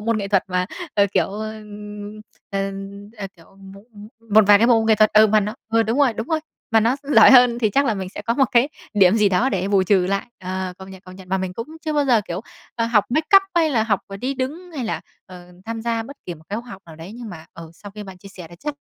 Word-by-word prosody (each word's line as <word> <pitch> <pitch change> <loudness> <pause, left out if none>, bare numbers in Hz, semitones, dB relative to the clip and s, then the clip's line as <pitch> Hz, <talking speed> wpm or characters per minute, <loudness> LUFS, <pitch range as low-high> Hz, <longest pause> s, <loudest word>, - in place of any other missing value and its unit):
môn 230 +1 0
nghệ 200 -1 -4
thuật 195 -2 +2
mà, 180 0 -1 0.3
ờ, 200 -1 +4
kiểu, - - +3
ơ, 215 +2 -6 1.0
ờ, 195 0 -2 0.5
ờ, 200 - -4
kiểu, 170 +3 -21
mộ 195 0 -13 0.5
một 220 0 +7
vài 205 0 +7
cái 230 - +3
bộ 235 -2 +5
môn 220 - -1
nghệ 220 - +5
thuật. 215 0 +3
Ừ, 215 +1 +7
mà 215 0 +3
nó 210 +1 -3 0.2
ừ, 225 0 +4
đúng 225 +4 -1
rồi, 280 -4 +4
đúng 225 +1 -5
rồi. 320 -1 0 0.3
Mà 225 - +4
nó 230 +4 +1
gi 285 +1 -3
giỏi - - +8
hơn 250 -2 +6
thì 220 -3 +1
chắc 280 +6 +2
là 230 - +1
mình 190 -2 -5
sẽ 205 - -9
có 230 +2 -1
một 270 - +3
cái 245 +3 +4 0.3
điểm 195 -2 +5
gì 210 -2 +4
đó 195 +8 +1
để 195 -5 -2
bù 200 -2 +3
trừ 185 -1 +2
lại. 195 +1 -2
Ờ, 185 0 -4
công 190 0 -11
nhận, 190 -1 -12
công 185 0 -13
nhận. 190 -1 -14
Mà 190 - 0
mình 185 -1 -4
cũng 230 +5 -6 0.2
chưa 310 - -1
bao 295 -1 +1
giờ, 245 -5 +3
kiểu, 175 +2 -4 0.3
ờ, 230 - -1
học 225 -3 +3
make 310 +9 +4
up 390 - +6
hay 325 -3 +3
là 230 -5 +2
học, 215 -3 0
ờ, 195 - -8
đi 255 +7 -3
đứng 300 +8 -5
hay 260 - -3
là, 220 - -3 0.3
ờ, 180 -1 -13
tham 225 0 -5
gia 230 -1 -1
bất 280 +5 -11
kỳ 175 - -5
một 160 0 -18
cái 210 - -3
khoá 240 0 -14
học 195 -2 -10
nào 160 -1 -12
đấy 165 +5 -10
nhưng 235 -1 -8
mà, 160 -2 -11
ừ, 165 -1 -11
sau 205 +4 -12
khi 210 +1 -9
bạn 190 -2 -11
chia 195 - -13
sẻ 185 -3 -11
thì 175 - -13
chắc 295 0 -4
210 Hz, 290 wpm, -21 LUFS, 190-235 Hz, 1.0 s, giỏi